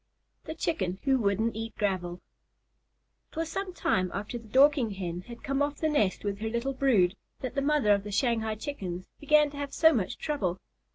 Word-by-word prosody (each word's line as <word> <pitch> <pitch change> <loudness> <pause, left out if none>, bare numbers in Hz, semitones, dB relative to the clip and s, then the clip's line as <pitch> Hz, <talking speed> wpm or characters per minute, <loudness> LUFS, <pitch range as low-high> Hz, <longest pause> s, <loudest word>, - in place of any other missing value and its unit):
THE 315 - -5
CHICKEN 190 - -1
WHO 270 -1 +3
WOULDN'T 215 +1 +1
EAT 225 0 -5
GRAVEL 180 -4 -1 1.1
It - - -21
was 325 0 -1
some 385 +2 -3
time 185 - 0
after 210 +4 -4
the 225 - -15
Dorking 260 -2 +4
Hen 175 -2 -4
had 235 -1 -10
come 275 0 -1
off 290 0 +1
the 315 - 0
nest 215 -11 +1
with 200 -1 -2
her 220 +1 -2
little 235 +4 -1
brood, 220 -9 +3 0.3
that 255 - -4
the 275 - 0
mother 285 -6 +3
of 200 -1 0
the 205 - -6
Shanghai 220 0 +1
Chickens 190 - -6
began 300 0 +4
to 285 - -10
have 285 -1 -4
so 320 0 +6
much 210 -9 -1
trouble. 195 - -2
230 Hz, 195 wpm, -29 LUFS, 200-285 Hz, 1.1 s, so